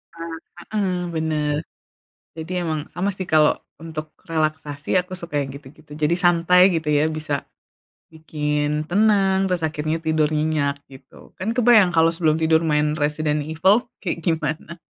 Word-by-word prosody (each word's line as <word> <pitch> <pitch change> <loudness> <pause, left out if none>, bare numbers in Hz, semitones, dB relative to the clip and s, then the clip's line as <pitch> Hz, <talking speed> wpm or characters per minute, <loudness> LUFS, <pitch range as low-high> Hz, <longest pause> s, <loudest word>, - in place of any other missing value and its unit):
Ah, 165 0 -7 0.5
heeh, 195 -3 +1 0.2
bener. 155 -2 0 0.8
Jadi 160 +3 -6
emang, 155 -2 -1
sama 185 +4 0
sih, 185 - -5
kalo 155 -1 +4 0.2
untuk 155 -1 -7 0.2
relaksasi 155 -2 -2
aku 180 +1 -11
suka 160 -5 -2
yang 135 - -6
gitu-gitu. 145 +2 -14
Jadi 155 +2 +2
santai 175 0 +4
gitu 160 -2 -2
ya, 150 +1 +2
bisa 155 -3 -3 0.7
bikin 150 -1 -2
tenang 195 -1 +3
terus 180 -2 -1
akhirnya 155 0 -2
tidur 155 -1 +1
nyenyak 150 -2 0
gitu. 135 -1 -16
Kan 205 +5 -2
kebayang 230 -7 +5
kalau 165 0 +4
sebelum 160 -1 0
tidur 160 0 +3
main 150 0 +1
Resident 150 0 -1
Evil 190 - +2 0.2
kayak 180 -5 -2
gimana? 160 0 -2
160 Hz, 145 wpm, -22 LUFS, 150-175 Hz, 0.8 s, kebayang